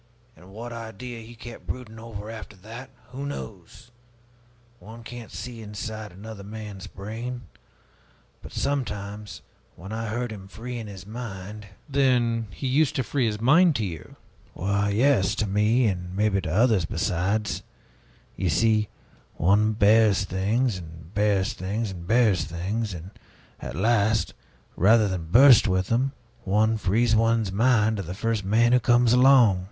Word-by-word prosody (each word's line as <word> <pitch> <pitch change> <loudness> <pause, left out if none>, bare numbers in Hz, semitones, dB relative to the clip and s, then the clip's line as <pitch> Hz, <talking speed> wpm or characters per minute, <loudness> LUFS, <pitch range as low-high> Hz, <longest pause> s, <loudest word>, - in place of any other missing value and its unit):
And 90 - -17
what 115 +4 -8
idea 115 +1 -7
he 115 +2 -12
kept 120 +1 -11
brooding 115 -3 -6
over, 110 -2 -8
after 110 -2 -9
that, 115 +7 -10 0.2
who 135 +2 -6
knows? 115 -5 -8 0.9
One 115 +2 -12
can't 120 -1 -9
see 120 -2 -7
inside 110 0 -6
of 90 - -16
another 105 0 -9
man's 105 -2 -8
brain. 115 +5 -6 1.0
But - - -11
sometimes, 105 -6 -3 0.3
when 95 +5 -10
I 115 +1 -3
heard 120 +2 -3
him 95 -3 -9
freeing 115 +2 -7
his 95 -2 -10
mind 105 -2 -7
" - - -34
"Then 125 -5 +1
he 90 - -8
used 140 +3 +2
to 130 - 0
free 130 -1 0
his 105 -1 -2
mind 160 +7 +5
to 110 - 0
you?" 80 -5 -8 0.4
"Why, 100 +2 0
yes, 105 -2 +3
to 110 - 0
me, 105 +5 +2
and 90 -3 -2
maybe 100 -1 +1
to 85 -3 -4
others 105 -2 +3
besides. 100 +7 -1 0.7
You 95 - -1
see, 105 +5 +2 0.5
one 105 +5 +3
bears 105 -2 +4
things 100 +4 0
and 80 +1 -12
bears 105 +1 +1
things 105 +2 -3
and 85 -2 -9
bears 110 -5 +3
things; 95 +5 -3
and 85 +3 -9 0.5
at 60 +1 -7
last, 110 +2 +2 0.4
rather 110 +3 +5
than 90 -4 -3
burst 125 +2 +7
with 95 0 0
them, 130 +4 +1 0.3
one 110 +3 +2
frees 110 +4 +2
one's 115 -2 +2
mind 110 0 +3
to - - -2
the 90 0 -6
first 115 0 -1
man 115 +5 +3
who 125 - +6
comes 120 -1 +4
along." 125 -6 +6
110 Hz, 155 wpm, -25 LUFS, 100-120 Hz, 1.0 s, burst